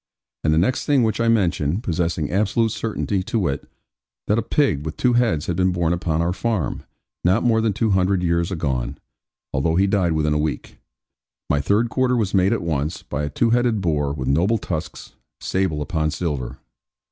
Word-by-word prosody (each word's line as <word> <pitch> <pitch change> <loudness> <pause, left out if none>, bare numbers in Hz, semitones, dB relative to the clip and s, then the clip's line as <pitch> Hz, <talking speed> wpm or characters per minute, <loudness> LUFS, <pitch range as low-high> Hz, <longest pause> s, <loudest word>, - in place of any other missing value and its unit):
And 75 - +2
the 80 - +3
next 100 +10 +1
thing 140 -4 +4
which 110 0 0
I 115 - +2
mentioned 95 - +1
possessing 85 - -1
absolute 110 +4 +1
certainty, 105 -3 -2
to 100 - -2
wit, 70 -9 -2 0.6
that 105 +2 +2
a - - +1
pig 110 - +1
with 80 0 -6
two 125 -1 +2
heads 115 -11 +2
had 90 - -2
been 95 +1 +2
born 85 -2 0
upon 85 -2 0
our 85 +1 0
farm, 105 - -2 0.4
not 95 +6 +3
more 115 -2 +3
than 110 -1 +1
two 110 +2 0
hundred 95 -1 +2
years 85 0 +1
agone 65 -8 -2 0.6
(although 80 +5 +1
he 95 +3 +4
died 95 -4 +1
within 75 -1 +1
a 75 - +1
week), 75 0 -4 0.7
my 70 0 +2
third 105 +10 +1
quarter 130 -1 +1
was 105 -4 -1
made 95 0 +3
at 115 - 0
once, 75 -2 -2
by 75 - -4
a - - -3
two 115 - +1
headed 120 -2 +2
boar 75 -6 0
with 65 -3 -4
noble 90 +12 +2
tusks, 85 -5 -6 0.3
sable 90 -6 -1
upon 80 +1 -1
silver. 75 -7 -3
90 Hz, 195 wpm, -22 LUFS, 80-110 Hz, 0.7 s, thing